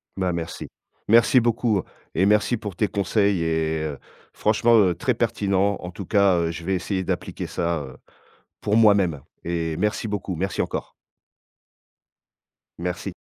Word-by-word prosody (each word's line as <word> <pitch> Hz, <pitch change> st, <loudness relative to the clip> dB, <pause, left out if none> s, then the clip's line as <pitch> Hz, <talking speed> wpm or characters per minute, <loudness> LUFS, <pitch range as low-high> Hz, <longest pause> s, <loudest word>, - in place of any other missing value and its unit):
Bah, 95 Hz, -2 st, -1 dB
merci, 85 Hz, -1 st, -5 dB, 0.4 s
merci 115 Hz, +3 st, +6 dB
beaucoup 115 Hz, -4 st, +1 dB, 0.3 s
et 95 Hz, -, +3 dB
merci 105 Hz, +4 st, +3 dB
pour 105 Hz, -4 st, -7 dB
tes 105 Hz, -, +1 dB
conseils 100 Hz, -2 st, +1 dB
et 80 Hz, -1 st, 0 dB
heu, 75 Hz, -3 st, -4 dB, 0.3 s
franchement, 115 Hz, +2 st, +3 dB
heu, 90 Hz, -4 st, +3 dB
très -, -, 0 dB
pertinent 100 Hz, 0 st, +1 dB
en 90 Hz, -, -7 dB
tout 95 Hz, +2 st, -8 dB
cas, 100 Hz, -2 st, +3 dB
heu, 85 Hz, -1 st, 0 dB
je 85 Hz, 0 st, -7 dB
vais 95 Hz, +3 st, -1 dB
essayer 95 Hz, +1 st, -2 dB
d'appliquer -, -, -3 dB
ça, 85 Hz, -1 st, -1 dB
heu, 65 Hz, -2 st, -11 dB, 0.6 s
pour 105 Hz, +1 st, +1 dB
moi-même 100 Hz, -9 st, +4 dB, 0.2 s
et 85 Hz, -2 st, -2 dB
merci 105 Hz, +3 st, -1 dB
beaucoup, 100 Hz, -3 st, -3 dB
merci 95 Hz, +4 st, -1 dB
encore. -, -, -4 dB, 1.9 s
Merci. 90 Hz, +1 st, -4 dB
95 Hz, 150 wpm, -23 LUFS, 85-105 Hz, 1.9 s, merci